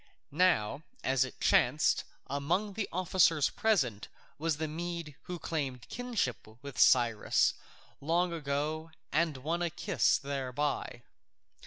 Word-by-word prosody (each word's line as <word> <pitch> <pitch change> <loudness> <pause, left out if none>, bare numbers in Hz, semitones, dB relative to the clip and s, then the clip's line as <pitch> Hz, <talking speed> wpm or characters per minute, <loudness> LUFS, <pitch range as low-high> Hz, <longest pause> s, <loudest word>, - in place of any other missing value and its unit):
Now, 145 -6 +2 0.2
as 130 -1 +3
it 130 - -8
chanced, 150 +6 +3 0.2
among 170 +10 -1
the 210 0 -3
officers 175 -4 +3
present 140 - +1 0.3
was 160 -1 0
the 160 0 -2
Mede 170 -1 -5
who 180 - -5
had 175 - -7
claimed 135 -7 -3
kinship 230 - -2 0.2
with 140 -2 -7
Cyrus 120 -4 +4 0.5
long 170 +4 +1
ago 155 +1 -2 0.2
and 155 -1 +1
won 160 +6 -2
a 175 - +1
kiss - - +2
thereby. 140 +1 -3
155 Hz, 125 wpm, -31 LUFS, 135-175 Hz, 0.5 s, Cyrus